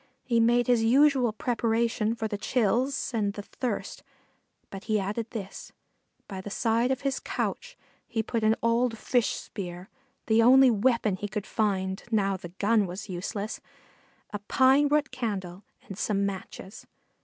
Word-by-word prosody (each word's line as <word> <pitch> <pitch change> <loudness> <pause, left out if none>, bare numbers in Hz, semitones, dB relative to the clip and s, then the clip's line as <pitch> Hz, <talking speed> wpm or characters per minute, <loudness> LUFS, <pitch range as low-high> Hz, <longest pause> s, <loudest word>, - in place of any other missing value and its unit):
He 235 -2 +1
made 240 +1 +3
his 240 -2 +3
usual 260 0 +4
preparations 230 -1 0
for 220 - -2
the 210 - -4
chills 250 +6 0
and 205 -3 0
the 205 - -7
thirst, 250 +4 -4 0.7
but 195 0 -8
he 215 -2 +1
added 210 +4 -3
this 200 -5 -8 0.5
by 190 -2 -6
the 205 - -7
side 230 +4 +1
of 265 0 -1
his 275 -1 -1
couch - - -4 0.3
he 225 -2 -2
put 230 0 -2
an 215 +1 +4
old 230 0 +1
fish 245 +1 0
spear 180 -2 -8 0.3
the 220 +1 +4
only 260 +2 +7
weapon 225 -3 +1
he 205 - -4
could 210 0 -4
find, 190 -3 -1
now 200 -3 +1
the 175 -2 -8
gun 205 +3 +1
was 190 +4 -7
useless 200 +4 -4 0.7
a 205 - -4
pine 270 +2 +4
root 300 +1 +1
candle 200 -7 -4 0.2
and 195 0 -8
some 200 -2 0
matches. 190 0 -7
225 Hz, 155 wpm, -27 LUFS, 200-245 Hz, 0.7 s, only